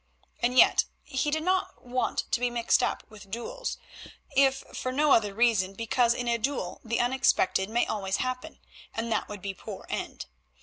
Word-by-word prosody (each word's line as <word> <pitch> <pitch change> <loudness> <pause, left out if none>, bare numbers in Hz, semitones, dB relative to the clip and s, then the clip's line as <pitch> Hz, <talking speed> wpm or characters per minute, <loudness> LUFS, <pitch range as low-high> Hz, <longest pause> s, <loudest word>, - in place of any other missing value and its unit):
And 245 +2 +1
yet - - +6 0.2
he 265 +3 -1
did 315 +1 -1
not 370 -3 -1
wish 250 +1 -1
to 245 - +2
be 245 0 +1
mixed 235 -1 +2
up - - -1
with 210 -2 -13
duels, - - -4 0.6
if 270 0 +4
for 255 - -3
no 295 +3 +2
other 210 -5 +4
reason 200 -3 +2
because 235 +2 +2
in 245 - -3
a 235 0 +1
duel 230 -7 -2
the 230 0 -1
unexpected 240 -6 +2
may 235 +2 +2
always 195 -3 -1
happen, 255 +4 -4 0.4
and 230 +1 -2
that - - 0
would 205 -2 -8
be 200 - -2
a - - -15
poor - - -9
end. - - -4
240 Hz, 185 wpm, -28 LUFS, 215-265 Hz, 0.6 s, yet